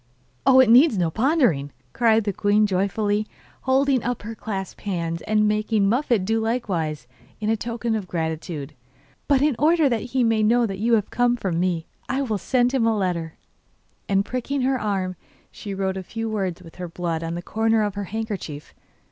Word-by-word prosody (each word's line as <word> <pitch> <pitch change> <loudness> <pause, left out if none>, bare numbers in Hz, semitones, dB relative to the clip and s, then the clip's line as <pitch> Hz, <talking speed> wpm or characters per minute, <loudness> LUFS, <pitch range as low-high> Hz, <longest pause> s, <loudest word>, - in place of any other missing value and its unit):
'Oh, 260 -1 +7
it 260 - +7
needs 245 +1 +6
no 170 -3 +1
pondering,' 225 - +2 0.2
cried 225 -2 +3
the 200 -1 -1
queen 205 +2 +3
joyfully, 205 +2 0 0.3
holding 265 -1 +2
up 245 -2 -3
her 225 +2 -5
clasped 205 -3 -6
hands, 170 -4 -3
and 215 0 +3
making 210 -1 +1
Muffette 235 -3 +1
do 225 +2 +1
likewise, 185 - -2 0.3
in 215 +1 +1
token 230 +1 -3
of 210 -4 -2
gratitude. 160 -3 -4 0.5
But 280 -1 +3
in 295 -3 +2
order 315 0 +4
that 235 -3 0
he 250 +2 -1
may 225 -2 +2
know 235 +3 +3
that 195 -3 -4
you 230 +3 +1
have 215 -3 +1
come 245 0 +2
from 185 -7 -2
me 175 -2 0 0.2
I 270 +2 0
will 220 -6 -2
send 250 +4 +2
him 240 -4 +2
a 225 -1 +2
letter.' 170 -4 -2 0.7
And 195 0 +2
pricking 255 +3 -2
her 260 0 +1
arm, 190 -4 -2 0.3
she 200 -2 -7
wrote 190 0 -1
a - - -3
few 225 +4 -5
words 190 -5 -3
with 165 - -14
her 180 -1 -5
blood 170 -1 -3
on 165 +1 -3
the 175 - -5
corner 225 +2 +1
of 205 -1 -1
her 205 0 -4
handkerchief. 195 -8 -5
215 Hz, 190 wpm, -23 LUFS, 185-235 Hz, 0.7 s, Oh